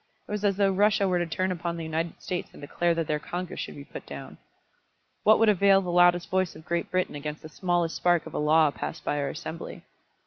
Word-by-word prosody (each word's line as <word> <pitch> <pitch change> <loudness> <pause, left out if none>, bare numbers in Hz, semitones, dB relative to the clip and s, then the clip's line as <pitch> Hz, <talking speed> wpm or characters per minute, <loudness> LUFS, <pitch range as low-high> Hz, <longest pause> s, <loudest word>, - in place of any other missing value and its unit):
It - - -9
was 210 0 -3
as 200 -2 +2
though 200 -1 +3
Russia 205 +1 +3
were 180 -1 +1
to 175 - -1
turn 185 +3 -1
upon 170 -1 -3
the 165 - -5
United 160 +1 -3
States 180 0 -3
and - - -13
declare 170 +4 0
that 165 -1 -1
their 150 0 -1
Congress 180 +3 -5
should - - -5
be 145 - -9
put - - -9
down. - - -9 0.8
What 215 +1 +6
would 225 - +4
avail 200 -1 +5
the 180 -2 -3
loudest 175 0 +4
voice 185 -2 0
of 155 +1 -13
Great 170 0 -2
Britain 185 0 0
against 150 +1 -6
the 155 - -8
smallest 175 0 0
spark 175 -2 +2
of - - -9
a - - -2
law 155 0 +4
passed 155 +2 -6
by 145 - 0
our 140 - -1
Assembly? 160 +2 -7
175 Hz, 240 wpm, -27 LUFS, 160-185 Hz, 0.8 s, What